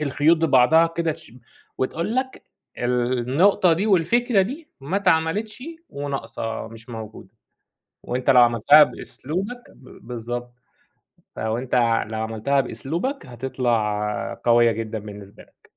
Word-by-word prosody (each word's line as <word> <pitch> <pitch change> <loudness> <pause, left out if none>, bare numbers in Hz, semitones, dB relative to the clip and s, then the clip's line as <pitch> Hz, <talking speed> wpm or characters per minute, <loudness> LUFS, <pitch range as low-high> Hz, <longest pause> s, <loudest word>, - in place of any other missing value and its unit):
الخيوط 150 +3 +3
ببعضها 160 +1 +4
كده 165 -1 -2
شم 140 -6 -16 0.4
وتقول 165 - -2
لك 260 0 -3 0.4
النقطة 125 +9 +2
دي 185 +6 0
والفكرة 215 +3 +3
دي 295 - -6
ما 145 +8 -2
اتعملتش 200 +5 0 0.3
وناقصة 135 -6 -5
مش 115 +1 -14
موجودة، 110 -4 -9 0.8
وأنت 125 +2 0
لو 125 -2 +7
عملتها 120 +6 +6
بأسلوبك 195 - -6
با 130 - -16
بالضبط، 120 +1 -6 0.8
فلو 110 +1 -2
أنت 125 0 -4 0.3
لو 110 0 -5
عملتها 115 +5 0
بأسلوبك 170 - -4
هتطلع 115 -4 -2
قويّة 120 -1 +5
جدًا 110 0 -4
بالنسبة 100 -1 -11
لك. - - -28
130 Hz, 120 wpm, -23 LUFS, 115-165 Hz, 0.8 s, لو